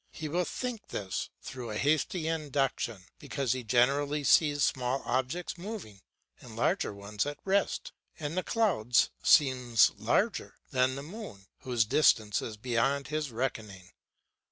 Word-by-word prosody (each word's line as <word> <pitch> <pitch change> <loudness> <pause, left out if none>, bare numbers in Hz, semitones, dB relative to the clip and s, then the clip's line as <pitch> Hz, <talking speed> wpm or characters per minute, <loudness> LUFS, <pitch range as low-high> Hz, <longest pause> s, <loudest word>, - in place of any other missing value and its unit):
He 155 - -6
will 175 +4 0
think 245 0 -5
this 95 -2 -4
through 125 -3 -7
a 105 - -3
hasty 155 - +1
induction, 135 - -1
because 135 -5 -2
he 130 -1 -4
generally 140 +6 +2
sees 145 +1 +4
small 130 +1 0
objects 130 +9 -2
moving 180 - -7 0.4
and - - -12
larger - - +1
ones 100 +4 -3
at 145 - -4
rest, 195 0 0 0.2
and 155 0 -4
the 185 - +1
clouds 175 - +2
seems 125 -6 +5
larger - - 0 0.2
than 130 0 +2
the 140 - -6
moon, 160 - -9
whose 120 -4 +1
distance 110 -5 +3
is 110 -2 -6
beyond 130 +5 0
his 155 -3 -2
reckoning. 110 -6 -4
135 Hz, 140 wpm, -30 LUFS, 115-155 Hz, 0.4 s, seems